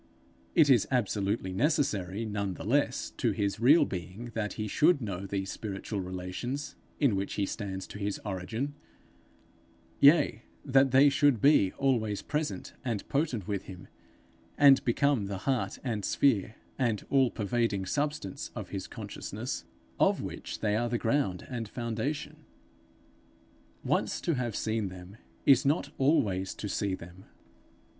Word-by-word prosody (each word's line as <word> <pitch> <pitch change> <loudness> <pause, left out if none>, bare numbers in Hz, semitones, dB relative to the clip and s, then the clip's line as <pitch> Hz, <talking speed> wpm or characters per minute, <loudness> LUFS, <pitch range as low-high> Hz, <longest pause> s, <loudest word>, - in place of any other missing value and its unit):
It 160 -4 +6
is 125 -7 +5
absolutely 100 -5 0
necessary, 115 - 0
none 100 -3 -2
the - - -8
less, - - 0
to - - +1
his 100 0 -1
real 145 +6 +6
being, 95 +5 -6
that 105 -2 -2
he 110 -1 -4
should 155 - +4
know 100 -5 -4
these 95 -1 -3
spiritual 100 0 -5
relations 95 +10 -5 0.2
in 135 -9 +3
which 95 0 -2
he 100 - +1
stands 95 -3 -5
to 100 - -9
his 100 -1 -2
Origin; 110 +8 -3 1.3
yea, 140 -6 +5 0.2
that 135 -1 +4
they 135 +3 +6
should 140 -4 +3
be 120 -8 +5
always 115 -7 0
present 150 +1 -3
and 115 -6 -3
potent 135 - -1
with 100 -2 -3
him, 90 -2 -10 0.7
and 140 -2 +7
become 125 -3 +2
the 100 -1 -4
heart 135 -3 0
and 110 -6 -2
sphere 110 -5 +2 0.2
and 115 -6 0
all 135 -2 +4
pervading 110 -2 -1
substance 145 -3 -2
of - - -6
his - - -5
consciousness, - - -6 0.3
of - - +4
which - - -6
they 105 -1 +1
are 120 +2 0
the 120 - 0
ground 115 -7 0
and 115 -4 -5
foundation. 115 +5 -3 1.5
Once - - 0
to 170 - 0
have 120 -5 -2
seen 110 -2 -1
them, 90 +3 -11 0.3
is 135 -3 +6
not 145 +5 +1
always 115 - +2
to 105 - -5
see 100 -1 -1
them. 90 +1 -13
110 Hz, 145 wpm, -30 LUFS, 100-135 Hz, 1.5 s, and